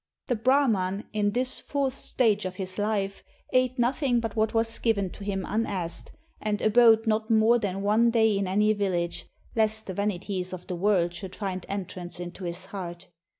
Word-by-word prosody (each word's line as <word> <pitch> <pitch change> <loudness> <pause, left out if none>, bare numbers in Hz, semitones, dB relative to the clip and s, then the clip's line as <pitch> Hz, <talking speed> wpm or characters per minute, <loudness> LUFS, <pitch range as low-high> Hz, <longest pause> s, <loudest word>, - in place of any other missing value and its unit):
The 245 - 0
Brahman, 220 -6 +2
in 210 -1 +1
this 255 +2 +4
fourth 275 -2 -1
stage 220 -6 +1
of 185 0 -4
his 185 +1 -3
life, 205 -2 -1 0.3
ate 255 0 +2
nothing 245 +1 +1
but 225 -2 -4
what 220 0 +1
was 225 0 0
given 200 -5 0
to 205 - -10
him 195 -2 -2
unasked, 195 -6 -3 0.3
and 210 -1 -1
abode 225 0 +5
not 220 0 0
more 225 +2 +4
than 195 -2 -3
one 220 +3 +4
day 220 -2 +3
in 195 -1 -1
any 210 +3 +3
village, 180 -4 -2 0.3
lest 220 -1 +2
the 190 - -5
vanities 190 -1 -2
of 180 -1 -7
the 180 - -4
world 175 -2 +2
should 185 +1 -7
find 190 -3 -4
entrance 185 -3 -6
into 175 +1 -7
his 175 +2 -3
heart. 185 -2 -7
205 Hz, 180 wpm, -27 LUFS, 185-225 Hz, 0.3 s, abode